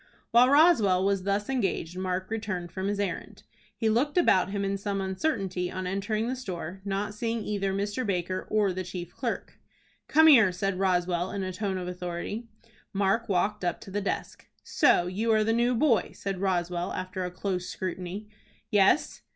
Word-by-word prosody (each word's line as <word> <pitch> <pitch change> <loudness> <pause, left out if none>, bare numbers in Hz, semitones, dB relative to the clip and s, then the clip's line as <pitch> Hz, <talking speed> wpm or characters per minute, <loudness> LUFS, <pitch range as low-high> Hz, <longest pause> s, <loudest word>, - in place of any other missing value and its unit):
While 245 +2 +6
Roswell 250 - +5
was 195 -1 +1
thus 200 +1 0
engaged 195 -9 -1
Mark 185 +1 -3
returned 200 -6 -3
from 190 0 -3
his 205 0 -1
errand. 195 -4 -4 0.3
He 225 - 0
looked 255 +9 +1
about 195 - +4
him 200 0 -2
in 195 0 0
some 195 0 -2
uncertainty 190 - -1
on 185 0 -4
entering 205 +4 -1
the 255 - -1
store, 190 -6 -6
not 200 +1 -2
seeing 230 +1 -2
either 200 -2 -1
Mr. 205 +5 -2
Baker 185 -3 -2
or 210 -3 +2
the 185 +1 -3
chief 180 -1 -7
clerk. - - -4 0.5
"Come 315 +1 +5
here," 230 -11 +7
said 185 +1 -2
Roswell, 180 -1 +1
in 200 -1 -3
a 185 0 -4
tone 195 -1 -2
of 180 -1 -4
authority. 180 +5 -5 0.4
Mark 200 +3 +1
walked 200 +2 0
up 175 -2 -1
to 195 - -10
the 205 +2 -1
desk. 200 - -4 0.2
"So 175 - +3
you 210 +6 -1
are 215 0 +4
the 225 +1 +1
new 240 +2 +2
boy?" 235 -5 +2
said 195 -2 -4
Roswell, 175 -2 -1
after 185 0 -4
a 180 - -2
close 180 0 -3
scrutiny. 185 +3 -5 0.4
"Yes." 205 +8 +3
195 Hz, 180 wpm, -28 LUFS, 185-215 Hz, 0.5 s, here